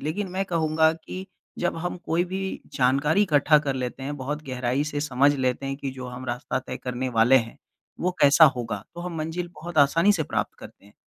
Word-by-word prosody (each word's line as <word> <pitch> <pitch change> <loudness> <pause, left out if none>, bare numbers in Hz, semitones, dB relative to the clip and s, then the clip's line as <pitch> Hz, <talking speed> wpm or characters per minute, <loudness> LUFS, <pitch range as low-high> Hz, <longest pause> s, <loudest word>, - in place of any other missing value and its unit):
लेकिन 185 +6 -3
मैं 190 +1 -1
कहूँगा 160 -2 +2
कि 185 +3 -8 0.3
जब 175 -1 -1
हम 175 +2 -3
कोई 170 +2 +1
भी 190 0 -3
जानकारी 140 +9 +3
इकट्ठा 150 -3 +4
कर 140 -3 -2
लेते 130 0 -4
हैं, 145 +2 -4
बहुत 145 +3 -4
गहराई 125 +2 -1
से 145 -1 -3
समझ 140 0 +3
लेते 130 0 -1
हैं 135 0 -3
कि 140 -1 -4
जो 130 -1 -8
हम 125 +1 -8
रास्ता 120 +2 -2
तय - - -6
करने 125 0 -3
वाले 120 +2 +5
हैं, 115 -2 -1 0.4
वो 180 - +1
कैसा 145 +3 +7
होगा? 115 -4 -4
तो 175 - -7
हम 175 0 -5
मंजिल 165 +3 -3
बहुत 170 -1 -4
आसानी 165 +8 +5
से 165 -5 0
प्राप्त - - -2
करते - - -13
हैं। 105 - -19
145 Hz, 210 wpm, -25 LUFS, 130-165 Hz, 0.4 s, कैसा